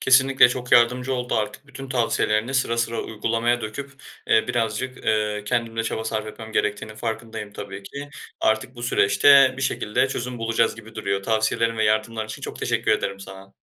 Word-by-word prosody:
Kesinlikle 130 -1 +6
çok 125 0 -4
yardımcı 125 +2 +4
oldu. 125 -1 -2
Artık 110 +5 -3
bütün 135 0 -9
tavsiyelerini 120 -1 0
sıra 125 -3 +1
sıra 115 0 -1
uygulamaya 115 +2 0
döküp, 140 +6 -6 0.3
eee, 110 - +4
birazcık, 120 +2 -2
ııı, 105 -1 0
kendim 115 0 -1
de 115 - +1
çaba 110 0 -3
sarf 110 -1 -2
etmem 110 +1 -9
gerektiğinin 105 0 -1
farkındayım 110 -2 -5
tabii 100 -1 -8
ki. 140 +8 -8 0.3
Artık 110 +4 0
bu 120 - -8
süreçte 130 +5 +5
bir 135 - -5
şekilde 125 +1 0
çözüm 125 -1 -4
bulacağız 115 0 +1
gibi 110 0 -13
duruyor. 100 -2 -2
Tavsiyelerin 115 +1 +1
ve 110 - +1
yardımların 110 +1 0
için 110 - -8
çok - - -6
teşekkür - - 0
ederim 100 0 -2
sana. 95 0 -11
115 Hz, 175 wpm, -23 LUFS, 110-125 Hz, 0.3 s, Kesinlikle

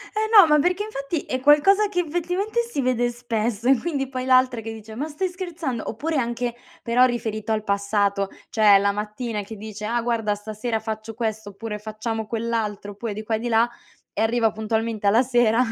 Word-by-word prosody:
Eh 435 0 0
no, 405 -5 +9
ma 300 -1 +5
perché, 360 +6 +1
infatti, 315 -6 -3
è 255 - -3
qualcosa 320 +10 +5
che 360 -3 -1
effettivamente 355 +7 -2
si 470 -12 -3
vede 245 -1 +1
spesso 235 -1 -2
e 270 - +7
quindi 275 -1 -2
poi 255 -1 -4
l'altra 255 -2 +3
che 225 0 -6
dice: 220 0 -10
"ma 275 +8 -3
stai 315 +5 -2
scherzando?" 340 - -4
oppure 305 +7 -2
anche, 240 -1 -1 0.3
però 245 +2 +4
riferito 220 -3 -2
al 215 -1 0
passato, 200 -1 0 0.2
cioè 210 -3 +6
la 200 +1 +2
mattina 210 +1 -4
che 215 +2 -9
dice: 210 0 -7
"Ah 235 +2 0
guarda, 225 -3 0
stasera 215 +2 -3
faccio 220 0 -6
questo 220 -2 -3
oppure 210 +1 -6
facciamo 215 +1 -4
quell'altro." 220 -3 -2
oppure 210 +2 -5
di 215 +1 -6
qua 220 0 -1
e - - -2
di 240 - -3
là, 230 0 +4 0.5
e 215 - -2
arriva 225 -1 +2
puntualmente 220 -1 -2
alla 230 +5 +5
sera 240 -1 +3
230 Hz, 195 wpm, -23 LUFS, 215-265 Hz, 0.5 s, no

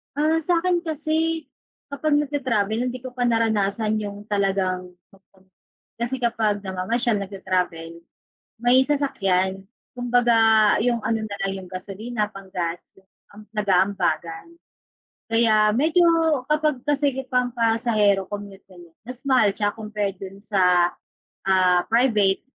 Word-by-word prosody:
Ah, 315 +2 +1
sa'kin 350 +1 +1
kasi, 320 0 -1 0.4
kapag 290 +1 0
nag 295 - -1
ta-travel, 235 -6 -1
hindi 255 - -7
ko 250 0 -9
pa 250 - -1
naranasan 220 -2 +1
yung 205 -1 -5
talagang 190 -3 -1 0.2
mag-com, 190 -1 -26 0.5
kasi, 240 +3 -3
kapag 225 -4 0
namamasyal 215 +6 -1
nagta-travel 180 -4 -3 0.7
may 245 +2 +5
sasakyan. 195 -10 0 0.3
Kumbaga, 245 -1 +2 0.4
yung 235 0 0
ano 225 -1 0
na 200 -1 -6
lang, 195 - -1
yung - - -14
gasolina 205 +4 -4
pang-gas 180 -3 -5 0.5
am 210 +1 -13
nag-aambagan. 185 -5 0 0.8
Kaya, 215 -2 +3
medyo 330 +6 +3 0.4
kapag, 300 -3 +1
kasi, 290 -1 +2 0.2
pang 250 -1 +1
pasahero 225 -4 +2
commute 200 0 -8
ganyan, 175 -3 -17
mas 250 +1 -8
mahal 255 -6 +4
siya 205 0 -1
compared 210 -3 -3
dun 195 +1 -10
sa, 180 -4 +3 0.6
ah, 185 -2 +4
private 220 -5 +2
215 Hz, 120 wpm, -23 LUFS, 195-250 Hz, 0.8 s, may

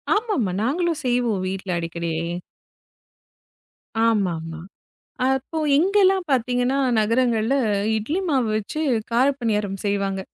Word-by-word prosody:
ஆமா, 435 +1 -1
ஆமா, 195 -5 0
நாங்களும் 325 +5 0
செய்வோம் 240 -6 +1
வீட்ல 190 +1 -4
அடிக்கடி. 170 0 -3 2.0
ஆமா, 205 -6 +2
ஆமா. 160 0 -7 0.7
அப்போ 265 +4 -1 0.2
இங்கெல்லாம் 380 +2 +3
பாத்தீங்கன்னா 250 +1 +1 0.2
நகரங்கள்ல, 230 +2 +2 0.4
இட்லி 290 - -2
மாவு 260 -6 +2
வச்சு 215 +8 -5 0.3
காரப்பணியாரம் 230 -6 +1
செய்வாங்க. 200 -1 0
235 Hz, 100 wpm, -23 LUFS, 200-275 Hz, 2.0 s, இங்கெல்லாம்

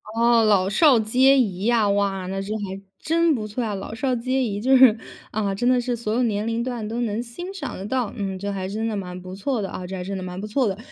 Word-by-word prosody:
哦， 235 0 +4
老 200 -3 +3
少 265 +2 +5
皆 260 +5 +4
宜 195 -4 -1
呀， 230 -3 +3
哇， 200 -2 0
那 195 +1 -3
这 205 +2 -4
还 195 -1 -6 0.2
真 330 0 +2
不 215 -2 -4
错 225 +4 -3
啊， 210 -2 -2
老 195 +3 -6
少 255 +2 -1
皆 255 +2 0
宜， 205 -3 -2
就 265 +4 +4
是 250 -4 +7 0.3
啊， 205 -2 -1
真 240 +5 -1
的 255 -1 +4
是 245 0 -1
所 220 -2 -3
有 250 +2 +2
年 210 -2 0
龄 230 +1 -1
段 240 -4 -4
都 235 +2 -3
能 225 0 -1
欣 350 +11 -8
赏 285 -10 -6
得 190 - -6
到， 245 -1 -1
嗯， 195 -2 -3
这 200 +1 -4
还 190 -1 -3
真 220 +3 -3
的 215 - -2
蛮 180 -2 -6
不 185 0 -9
错 225 +3 -2
的 195 - -3
啊， 180 - -6
这 190 +1 -6
还 180 - -5
真 195 +1 -4
的 185 - -5
蛮 180 0 -6
不 - - -5
错 240 +2 +1
的。 195 0 -2
215 Hz, 290 characters per minute, -23 LUFS, 195-245 Hz, 0.3 s, 是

